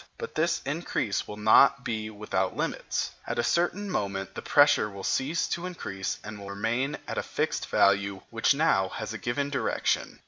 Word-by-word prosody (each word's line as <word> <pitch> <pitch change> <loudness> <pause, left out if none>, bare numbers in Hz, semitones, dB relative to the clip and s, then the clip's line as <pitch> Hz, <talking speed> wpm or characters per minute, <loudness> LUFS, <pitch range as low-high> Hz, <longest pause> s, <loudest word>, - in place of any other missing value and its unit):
But 465 - -6
this 170 +1 +1
increase 145 -8 -1
will 105 - -7
not 125 +5 +5
be 110 -3 -2
without 105 -3 -2
limits. - - -2 0.2
At - - -2
a 120 - +2
certain 175 +8 +1
moment 100 - -2
the - - -6
pressure 145 -7 +4
will 100 -1 -9
cease 145 - 0
to 170 +1 -2
increase 95 - -4
and 105 -1 -7
will 100 0 -8
remain 115 +7 -1
at - - -2
a - - 0
fixed - - -2
value 100 -1 +3
which 115 +4 +3
now 115 -11 +2
has 110 +2 -5
a 110 - -6
given 140 +4 -2
direction. 140 - -1
110 Hz, 180 wpm, -28 LUFS, 100-145 Hz, 0.2 s, not